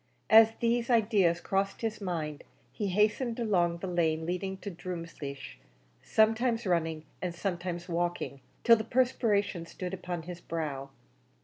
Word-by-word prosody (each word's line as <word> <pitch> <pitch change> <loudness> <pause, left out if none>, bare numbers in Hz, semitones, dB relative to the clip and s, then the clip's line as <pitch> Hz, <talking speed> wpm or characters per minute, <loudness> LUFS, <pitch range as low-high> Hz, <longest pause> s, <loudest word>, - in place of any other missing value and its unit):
As 225 0 +8
these 235 +1 +1
ideas 205 -7 +3
crossed 195 +2 -1
his 225 -2 -2
mind 160 -6 -3 0.3
he 205 - -3
hastened 215 +5 +1
along 175 -7 +2
the 175 - -6
lane 160 -3 +1
leading 190 +2 -2
to 200 +1 -6
Drumleesh, 165 - -7 0.4
sometimes 225 +2 +2
running 165 -3 0 0.2
and 180 -2 -3
sometimes 175 -1 -3
walking, 175 -5 -2 0.2
till 230 -1 +7
the 220 - -2
perspiration 215 -7 +1
stood 180 +1 -6
upon 180 -2 -4
his 175 +1 -8
brow. 145 -5 -4
180 Hz, 135 wpm, -30 LUFS, 170-220 Hz, 0.4 s, As